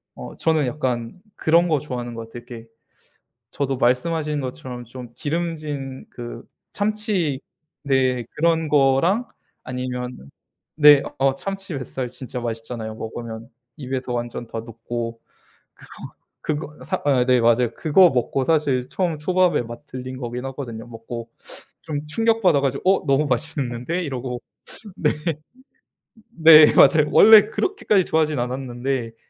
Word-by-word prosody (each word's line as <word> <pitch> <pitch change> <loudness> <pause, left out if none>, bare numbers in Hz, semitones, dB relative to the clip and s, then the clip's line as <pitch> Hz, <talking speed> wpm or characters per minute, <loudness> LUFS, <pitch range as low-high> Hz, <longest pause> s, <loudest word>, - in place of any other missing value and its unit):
어 60 -1 -9
저는 155 -4 +1
약간 125 +3 -3
그런 170 +2 +3
거 155 -3 +2
좋아하는 125 -4 -5
것 115 0 -7
같아요. 120 +1 -10
이렇게 115 -2 -10 0.8
저도 135 -1 -2
말씀하신 150 +4 +1
것처럼 125 -1 -6
좀 120 0 -10
기름진 150 -4 -4
그 120 -1 -8 0.3
참치 205 - -1 0.4
네. 130 -3 +1
그런 165 0 +1
거랑 150 - +3 0.4
아니면 125 - -5 0.5
네. 150 -2 +8 0.2
어 135 0 +3
참치 195 +1 -5
뱃살 130 -1 -5
진짜 125 0 -7
맛있잖아요. 115 -1 -5
먹으면 115 0 -7 0.3
입에서 130 -3 -4
완전 120 0 -4
다 115 - -5
녹고. 115 0 -6 0.5
그거 - - -18 0.8
그거 150 0 -15
사 - - -2
아 130 -4 +3
네 125 -1 +4
맞아요. 120 0 +3
그거 175 +3 +5
먹고 130 +1 -1
사실 140 -6 +1
처음 170 -5 -1
초밥에 180 +1 +2
맛 120 +1 -10
들린 130 0 -7
거긴 125 0 -5
하거든요. 120 -4 -6
먹고 115 0 -8 0.5
좀 150 -2 -4
충격받아가지고 180 - +2
'어 195 - +2
너무 140 +2 +3
맛있는데.' 135 +3 -2
이러고. 125 -4 -4 0.6
네. 150 - +2 1.2
네. 160 -6 +8
맞아요. 150 -1 +6
원래 215 -1 +8
그렇게까지 220 - +1
좋아하진 155 -2 +1
않았는데 125 0 -3
그 115 - -29
135 Hz, 285 characters per minute, -22 LUFS, 120-155 Hz, 1.2 s, 네